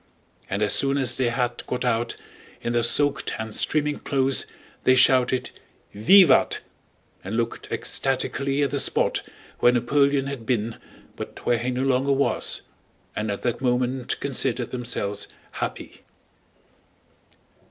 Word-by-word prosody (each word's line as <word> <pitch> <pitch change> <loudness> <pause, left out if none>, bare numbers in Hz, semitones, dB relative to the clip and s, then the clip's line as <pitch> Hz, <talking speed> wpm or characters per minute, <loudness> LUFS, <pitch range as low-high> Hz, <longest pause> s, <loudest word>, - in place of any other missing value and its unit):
And 100 +2 -1
as 105 - +4
soon 140 0 +4
as 125 -3 +2
they 125 -2 +1
had 120 0 -2
got 125 0 -3
out, 120 -1 0 0.4
in 120 - -3
their 120 - +2
soaked 145 +5 +3
and 110 -1 -6
streaming 150 -1 0
clothes, 135 -1 0 0.4
they 130 - +5
shouted 130 0 +3 0.4
"Vivat!" 140 - +5 0.6
and 100 +4 -4
looked 115 -1 -3
ecstatically 135 +1 -1
at 140 - -1
the 140 - -1
spot - - +2 0.4
where 120 - +5
Napoleon 140 +3 +2
had 140 -4 -5
been 115 -1 -2 0.4
but - - -9
where 120 - +2
he 120 +2 -2
no 125 +1 -2
longer 135 +1 +2
was 140 +1 0 0.5
and 105 0 -2
at 100 - -4
that 120 0 -2
moment 125 0 -1
considered 130 -3 -2
themselves 120 -5 -3 0.2
happy. - - -6
125 Hz, 135 wpm, -24 LUFS, 120-135 Hz, 0.6 s, they